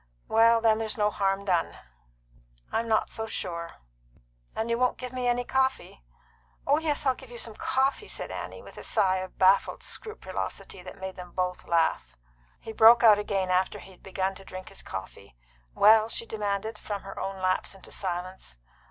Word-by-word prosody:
"Well, 230 +1 +5
then, 220 -1 +4
there's 225 +2 -3
no 210 -1 +2
harm 195 0 0
done." 175 -4 0 0.9
"I'm 230 +1 0
not 220 -1 +1
so 220 -1 -4
sure." 170 -5 -4 0.8
"And 220 - -1
you 235 0 +1
won't 250 -1 +2
give 250 0 -7
me 250 -1 -1
any 245 0 +2
coffee?" 265 - -1 0.6
"Oh 290 +2 +4
yes, 300 -3 -1
I'll 265 - +4
give 260 0 -14
you 240 - -9
some 230 -1 -4
coffee," 270 - 0
said - - -6
Annie, - - -6
with - - -11
a - - -9
sigh 190 -1 +2
of 185 0 -6
baffled 190 +1 +3
scrupulosity 435 - -6
that 185 - -10
made 190 0 -6
them 180 -1 -9
both 180 -1 -2
laugh. 65 - +1 0.4
He 225 - -8
broke 230 +2 +7
out 215 -3 +8
again 195 -3 -1
after 185 +1 +1
he 190 - -12
had 185 - -19
begun 190 0 -2
to 195 - -12
drink 185 0 -9
his 195 - -9
coffee. 95 -3 -8 0.4
"Well?" 220 +1 +6
she 230 - -4
demanded, 210 0 -3
from 205 -2 -5
her 195 0 -8
own 195 0 -4
lapse 185 +1 0
into 195 - -13
silence. 180 - -4
205 Hz, 185 wpm, -28 LUFS, 185-230 Hz, 0.9 s, out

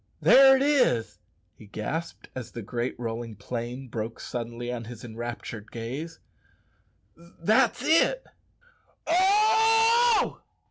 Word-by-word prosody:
"There 270 0 +7
it 265 - +1
is," 265 - +1 0.3
he 105 - -16
gasped, 155 +12 -5
as 125 -3 -7
the 115 - -8
great 120 +3 -4
rolling 115 -1 -5
plain 120 +5 -6
broke 115 -1 -5
suddenly 120 0 -5
on 115 -2 -6
his 115 -1 -10
enraptured 115 -2 -7
gaze; 135 +8 -6 1.2
"that's 235 +7 +2
it 335 - +2 0.8
oh! 445 +5 +3
125 Hz, 105 wpm, -26 LUFS, -, 1.2 s, There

